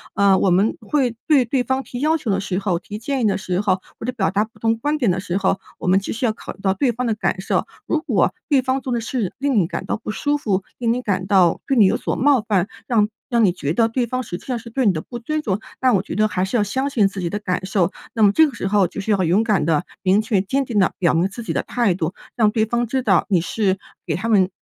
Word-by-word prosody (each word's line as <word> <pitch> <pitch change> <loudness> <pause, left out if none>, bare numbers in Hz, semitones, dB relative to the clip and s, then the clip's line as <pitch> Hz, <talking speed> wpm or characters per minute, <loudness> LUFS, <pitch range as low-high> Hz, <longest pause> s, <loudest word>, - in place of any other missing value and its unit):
嗯， 200 -1 +4
我 195 - +3
们 195 +5 +2
会 245 +1 0
对 280 -5 +4
对 250 +2 0
方 265 +1 0
提 245 -2 -7
要 310 +4 +2
求 255 - -5
的 195 - +1
时 190 -2 -2
候、 195 -4 0
提 205 +4 -8
建 265 +3 -2
议 - - +2
的 205 - +2
时 180 -1 -2
候， 190 -3 +1 0.2
或 - - -7
者 250 - -1
表 195 -6 0
达 200 +2 +1
不 220 - -23
同 225 0 +2
观 295 +6 -1
点 240 -7 +2
的 185 +1 +1
时 180 -1 -4
候， 195 -1 +1 0.2
我 - - -5
们 185 +2 +5
其 195 - -5
实 230 - -2
要 - - +2
考 - - -9
虑 - - -23
到 190 -1 +2
对 255 +5 +2
方 245 +2 -3
的 225 - 0
感 210 - -1
受， - - 0 0.2
如 315 - 0
果 - - +1 0.2
对 280 -3 +4
方 260 +1 -1
做 260 - -5
的 240 - 0
事 225 -4 -2
令 280 -1 0
你 180 - +3
感 170 - -5
到 - - -1
不 215 -1 -5
舒 290 +6 0
服， 200 -9 0 0.2
令 235 -2 0
你 250 - -2
感 195 -5 -1
到 185 -4 +3
对 275 - 0
你 215 - +7
有 - - +2
所 - - -2
冒 280 0 +4
犯， 200 -3 0 0.2
让 215 -4 +2 0.2
让 235 -1 +3
你 185 - +4
觉 150 -4 -2
得 225 +5 +3
对 240 +2 -1
方 255 +2 -2
实 175 -8 -6
际 - - -17
上 250 -3 -2
是 230 +1 -11
对 255 +2 0
你 205 - +5
的 155 - -3
不 240 - -8
尊 305 +6 -2
重， 205 -8 -1 0.2
那 260 -1 +4
我 195 - +3
觉 - - -7
得 215 +1 +3
还 185 -3 -1
是 190 - -4
要 210 - +3
相 260 +7 -1
信 225 -8 +3
自 195 0 -7
己 175 - -1
的 210 - -2
感 190 -2 -2
受。 190 -2 +1 0.2
那 225 - -2
么 205 - +6
这 320 - +6
个 280 - -7
时 210 - -3
候 200 -2 +3
就 175 - -8
是 195 - -7
要 195 -2 +2
勇 180 +6 +3
敢 210 -8 +1
地 160 0 +2 0.2
明 195 +2 +4
确 215 -2 +1
坚 270 +9 0
定 235 -4 -3
地 190 - +3
表 175 - +3
明 170 +3 +2
自 220 +5 -8
己 - - -3
的 - - -1
态 235 -6 +1
度， 170 -1 -2 0.2
让 220 -3 +3
对 220 -1 +1
方 235 +2 0
知 260 +3 -1
道 250 - +3
你 185 -4 +3
是 190 +2 0 0.3
给 165 - -1
他 220 +6 -3
们 190 -4 +4
215 Hz, 320 characters per minute, -21 LUFS, 190-245 Hz, 0.3 s, 你